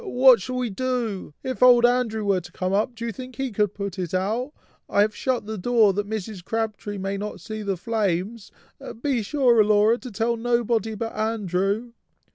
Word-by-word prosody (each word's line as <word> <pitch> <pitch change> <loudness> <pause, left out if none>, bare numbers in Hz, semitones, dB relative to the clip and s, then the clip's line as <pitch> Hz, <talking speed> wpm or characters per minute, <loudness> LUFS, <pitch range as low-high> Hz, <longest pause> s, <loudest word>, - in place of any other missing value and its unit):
what 255 - +5
shall 255 +6 -4
we 250 -3 -1
do? 235 -5 -2
If 260 -2 -4
old 245 -1 +7
Andrew 240 -3 +1
were 195 -2 +2
to 175 +1 -13
come 185 +1 -2
up, 215 +4 0
do 235 0 -5
you 230 - -2
think 255 +2 -9
he 270 +1 -3
could 210 -1 0
put 200 -2 -5
it 180 0 -3
out? 220 +9 -1 0.4
I 200 - +3
have 215 +1 +1
shut 255 -5 -1
the 215 -1 -5
door 225 -1 +4
that 205 +1 -3
Mrs. 215 -3 -5
Crabtree 215 -1 -3
may 195 +1 -3
not 210 +1 -5
see 215 -1 -6
the 200 -2 -2
flames. 205 +1 -2 0.5
Be 270 -5 +1
sure, 240 0 +3
Laura, 210 +3 +3
to 255 - -8
tell 230 +2 -1
nobody 235 -2 0
but 225 +2 -4
Andrew." 215 +1 -1
220 Hz, 195 wpm, -24 LUFS, 200-240 Hz, 0.5 s, old